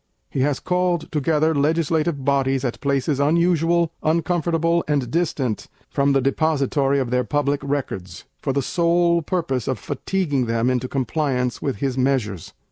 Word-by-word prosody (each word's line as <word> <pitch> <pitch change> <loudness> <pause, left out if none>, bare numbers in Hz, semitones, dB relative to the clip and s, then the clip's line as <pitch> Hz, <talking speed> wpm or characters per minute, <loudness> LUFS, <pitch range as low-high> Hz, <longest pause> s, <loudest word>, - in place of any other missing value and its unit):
He - - -2
has 140 +1 +1
called 180 -2 0
together 155 +1 +1
legislative 155 -1 0
bodies 135 -1 +1
at 120 - -3
places 140 0 0
unusual, 170 +2 +2
uncomfortable, 170 +1 +1
and 140 -5 0
distant 130 - -1 0.2
from 140 0 +2
the 135 - +3
depository 140 -1 +1
of 130 -3 -1
their 125 0 +2
Public 145 +3 0
Records, 95 -11 -4 0.2
for 135 - -1
the 135 0 0
sole 170 +2 +2
purpose 145 - -2
of 130 - 0
fatiguing 145 - -1
them 115 +2 +1
into 125 0 -1
compliance 130 -2 -1
with 135 - -1
his 130 +4 -2
measures. 125 - -1
140 Hz, 145 wpm, -22 LUFS, 130-165 Hz, 0.2 s, the